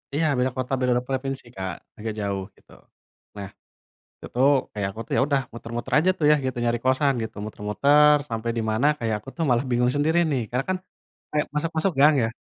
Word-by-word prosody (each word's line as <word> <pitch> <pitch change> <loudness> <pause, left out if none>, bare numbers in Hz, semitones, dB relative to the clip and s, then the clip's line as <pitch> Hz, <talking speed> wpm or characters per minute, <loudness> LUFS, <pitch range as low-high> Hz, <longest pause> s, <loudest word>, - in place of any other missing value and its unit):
Iya 160 +1 +1
beda 125 +1 +1
kota, 130 +1 -3
beda 125 -1 +1
provinsi, 135 0 -3
Kak, 95 -2 -4 0.2
agak 110 0 -4
jauh 100 -1 -2
gitu. - - -24 0.7
Nah 100 -1 -6 0.7
itu 125 - -6 0.3
kayak 100 -2 -2
aku 110 - -11
tuh - - -6
ya - - +4
udah 140 -2 +2
muter-muter 115 0 -6
aja 175 +5 +3
tuh 150 - 0
ya 150 - +6
gitu 130 -1 -3
nyari 120 0 +1
kosan 135 +2 +3
gitu, 110 - -7
muter-muter 140 +9 +4
sampai 115 0 -3
di - - +1
mana 110 +6 +1
kayak 115 -2 -1
aku 105 - -11
tuh 165 - -1
malah 120 +2 +2
bingung 125 0 +2
sendiri 155 +4 +2
nih 130 -4 +1
karena 125 +2 -1
kan 185 - +1 0.5
kayak 150 0 +1
masuk-masuk 165 +3 0
gang 150 +2 +7
ya. - - +2
125 Hz, 200 wpm, -24 LUFS, 115-145 Hz, 0.7 s, gang